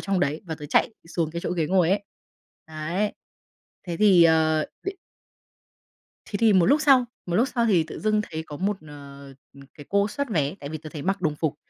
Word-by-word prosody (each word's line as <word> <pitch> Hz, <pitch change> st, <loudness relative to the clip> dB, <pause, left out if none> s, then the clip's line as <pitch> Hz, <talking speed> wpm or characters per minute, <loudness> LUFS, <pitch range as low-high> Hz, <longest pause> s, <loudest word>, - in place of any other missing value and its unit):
trong 195 Hz, -2 st, -1 dB
đấy, 145 Hz, +1 st, 0 dB
và 165 Hz, -3 st, -5 dB
tớ 150 Hz, -1 st, -9 dB
chạy 155 Hz, -, +2 dB
xuống 165 Hz, -2 st, -2 dB
cái 170 Hz, +1 st, -5 dB
chỗ -, -, -3 dB
ghế 170 Hz, -3 st, 0 dB
ngồi 180 Hz, 0 st, +3 dB
ấy. 200 Hz, +1 st, +1 dB, 0.6 s
Đấy. 165 Hz, +6 st, -2 dB, 0.7 s
Thế 170 Hz, -2 st, -3 dB
thì, 195 Hz, -4 st, +6 dB
ờ, 160 Hz, -1 st, +3 dB, 0.2 s
b -, -, -2 dB, 1.4 s
Thế 205 Hz, -, -4 dB
thì 225 Hz, 0 st, +4 dB
một 185 Hz, -3 st, +4 dB
lúc 290 Hz, +3 st, +4 dB
sau 270 Hz, -4 st, +5 dB, 0.2 s
một 175 Hz, -1 st, -1 dB
lúc 245 Hz, +4 st, +3 dB
sau 240 Hz, -2 st, 0 dB
thì 185 Hz, -7 st, +4 dB
tự 155 Hz, -, -9 dB
dưng 215 Hz, 0 st, +2 dB
thấy 160 Hz, -1 st, -4 dB
có 150 Hz, -, -8 dB
một, 200 Hz, +5 st, -1 dB
ờ, 140 Hz, -1 st, -11 dB, 0.3 s
ừ, 140 Hz, -, -14 dB
cái 145 Hz, -, -12 dB
cô 200 Hz, +1 st, +2 dB
soát 280 Hz, +6 st, -3 dB
vé, 150 Hz, -5 st, 0 dB
tại 140 Hz, -, -6 dB
vì 155 Hz, +1 st, -5 dB
tớ 155 Hz, +1 st, -10 dB
thấy 150 Hz, -, -6 dB
mặc 195 Hz, +3 st, -1 dB
đồng 155 Hz, -3 st, +1 dB
phục, 155 Hz, -1 st, -1 dB
170 Hz, 220 wpm, -25 LUFS, 155-205 Hz, 1.4 s, thì